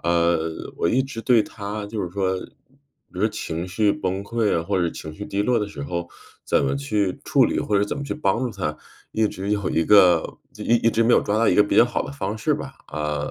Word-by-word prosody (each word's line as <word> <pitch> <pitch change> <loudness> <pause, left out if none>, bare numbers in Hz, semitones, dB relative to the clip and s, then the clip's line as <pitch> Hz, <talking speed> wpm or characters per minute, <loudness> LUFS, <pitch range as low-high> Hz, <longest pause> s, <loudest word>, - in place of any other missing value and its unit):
呃， 85 -1 0
我 - - +1
一 130 +8 +2
直 130 -4 -6
对 115 -1 +4
她 105 0 -6
就 105 0 -4
是 90 - -3
说 95 0 -1 0.7
比 90 - -9
如 - - -2
说 110 - +3
情 85 -4 -5
绪 105 +2 +2
崩 95 +2 -3
溃 115 -3 0
啊， 80 - 0
或 95 +2 0
者 85 - +1
情 80 -1 -8
绪 105 +6 -8
低 100 +1 -1
落 125 +2 +2
的 105 -2 -2
时 75 -9 -7
候 85 +3 -4 0.4
怎 - - +2
么 70 0 0
去 95 +7 -1
处 - - +4
理， - - 0
或 105 - 0
者 100 - +2
怎 105 - -4
么 - - -4
去 140 - -3
帮 105 -8 0
助 125 -1 -1
她， 90 -8 -3 0.4
一 110 -1 +2
直 95 +2 -5
有 100 -2 0
一 80 - +1
个 90 -5 +5 0.2
一 120 - +2
一 115 0 +2
直 115 - +2
没 115 +1 +3
有 - - +6
抓 105 - -1
到 115 +1 +3
一 - - +3
个 105 - +6
比 105 - -1
较 - - +8
好 120 - -2
的 - - -7
方 110 -6 -4
式 - - +1
吧。 - - -7
啊， 75 0 -3
100 Hz, 275 characters per minute, -23 LUFS, 85-110 Hz, 0.7 s, 较